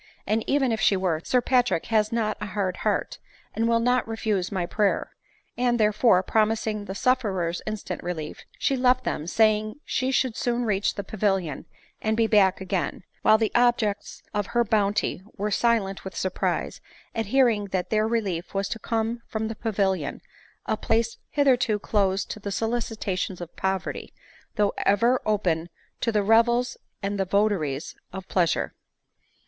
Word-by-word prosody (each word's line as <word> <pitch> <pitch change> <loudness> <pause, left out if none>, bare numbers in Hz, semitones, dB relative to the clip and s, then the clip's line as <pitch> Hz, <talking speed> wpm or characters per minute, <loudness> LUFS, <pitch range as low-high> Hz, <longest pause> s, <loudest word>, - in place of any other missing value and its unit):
and 215 +2 +1
even 270 -3 +2
if 220 -1 -1
she 195 - +4
were, 175 -4 0
Sir 250 - +2
Patrick 245 -8 +2
has 215 -2 +1
not 220 -2 0
a 210 - -3
hard 190 -2 -2
heart, - - -1 0.3
and 225 +1 0
will 230 0 +3
not 245 +1 +2
refuse 215 -5 -1
iny 185 -4 -2
prayer; 205 +2 0 0.5
and, 240 -1 +2
therefore, 210 -2 +4
promising 215 0 0
the 190 - -6
suf 255 +3 +3
ferers 180 -6 -2
instant 215 -1 -4
relief, 160 -4 -5
she 275 - +1
left 255 0 +3
them, 150 - -3
saying 215 +2 +2
she 260 0 0
should 260 -3 +1
soon 240 0 0
reach 205 -2 0
the 200 - -4
Pavilion 195 -7 -1 0.4
and 220 0 0
be 230 - +4
back 205 -4 +4
again; 190 -1 -2 0.2
while 215 - +6
the 220 -1 0
objects 240 -4 +1
of 205 -2 -1
her 240 0 +2
bounty 205 -3 +1 0.2
were 210 +1 -1
silent 205 -3 +1
with 190 - -7
surprise 185 -1 -2 0.3
at 225 -2 -2
hearing 235 -4 +3
that 190 -2 -3
their 215 0 +2
relief 200 -7 -2
was 195 0 0
to 225 - -4
come 230 +1 -2
from 220 0 -3
the 225 - -5
Pavilion, 200 -4 -1 0.5
a - - 0
place 230 0 0
hith 285 -1 +1
erto 245 -5 +3
closed 200 -2 0
to - - -6
the 200 -1 -5
solicitations 220 -4 -2
of 175 -1 -8
poverty, 190 0 -3 0.4
though 210 -2 +2
ever 235 +6 +3
open 175 -6 0 0.3
to 230 - 0
the 210 -2 +1
revels 235 +3 +3 0.3
and 200 0 -2
the 195 - +1
votaries 185 -8 0 0.2
of 190 0 -7
pleasure. 175 -4 +1
215 Hz, 165 wpm, -25 LUFS, 195-230 Hz, 0.5 s, while